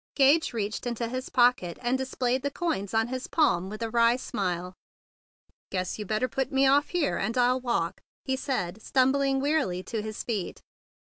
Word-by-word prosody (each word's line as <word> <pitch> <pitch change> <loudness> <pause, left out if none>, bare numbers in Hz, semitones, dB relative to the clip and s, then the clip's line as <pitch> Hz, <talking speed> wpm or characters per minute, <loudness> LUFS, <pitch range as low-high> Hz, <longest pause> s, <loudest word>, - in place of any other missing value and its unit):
Gage 285 +4 +4
reached 220 +1 -3
into 235 -1 -2
his 255 +2 -4
pocket, 245 -9 +3
and 245 +1 0
displayed 260 -1 -1
the 285 - -1
coins 280 - -2
on 225 +1 +1
his 260 0 -4
palm 190 - +2
with 215 +2 -5
a 225 - -2
wry 235 0 +4
smile. 180 -7 -3 1.0
"Guess 185 +1 -3
you 210 - -5
better 215 +5 0
put 265 0 -2
me 270 0 +3
off 280 +2 +4
here, 345 -5 0
and 225 +5 -2
I'll 250 +1 +3
walk," 235 -9 -1 0.2
he 265 - 0
said, 220 -8 -3
stumbling 270 +2 +2
wearily 275 - 0
to 220 +3 -3
his 215 0 -5
feet. 210 -7 -4
245 Hz, 180 wpm, -27 LUFS, 210-265 Hz, 1.0 s, Gage